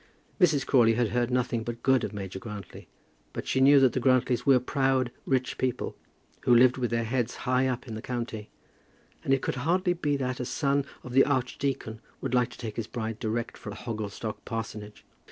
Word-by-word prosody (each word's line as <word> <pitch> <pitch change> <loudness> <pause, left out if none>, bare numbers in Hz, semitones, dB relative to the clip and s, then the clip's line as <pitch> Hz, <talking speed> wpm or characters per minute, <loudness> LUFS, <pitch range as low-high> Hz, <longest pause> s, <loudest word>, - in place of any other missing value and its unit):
Mrs. 155 -7 +4
Crawley 115 -4 +4
had 120 -1 +1
heard 120 +1 0
nothing 125 -2 0
but 120 0 -6
good 130 -2 +4
of - - -2
Major 95 -2 -6
Grantly; 105 -4 -9 0.5
but - - -5
she 130 - +1
knew 140 +1 +7
that 130 -3 +4
the - - 0
Grantlys 130 0 +2
were 135 -2 +7
proud 130 -1 +1 0.2
rich 130 -2 0
people, 130 -2 -1 0.4
who 125 -2 +4
lived 125 +1 +6
with 125 -2 -1
their 115 0 0
heads 120 +1 -1
high 130 +1 +2
up 125 0 -3
in 115 - -6
the 110 - -5
county, 115 -4 -4 0.7
and - - -1
it 135 -1 +3
could - - -2
hardly 175 +7 +1
be 150 -5 0
that 130 -2 -2
a 125 - -2
son 140 +2 0 0.2
of 125 - -8
the 135 - +7
archdeacon 130 -4 -2 0.2
would 135 -2 -4
like 125 -1 +3
to - - -13
take 110 -3 -6
his 115 -2 -3
bride 115 -2 -4
direct 115 0 -2
from 105 - -7
Hogglestock 110 -1 -5
parsonage. 105 -2 -6
125 Hz, 200 wpm, -28 LUFS, 115-130 Hz, 0.7 s, knew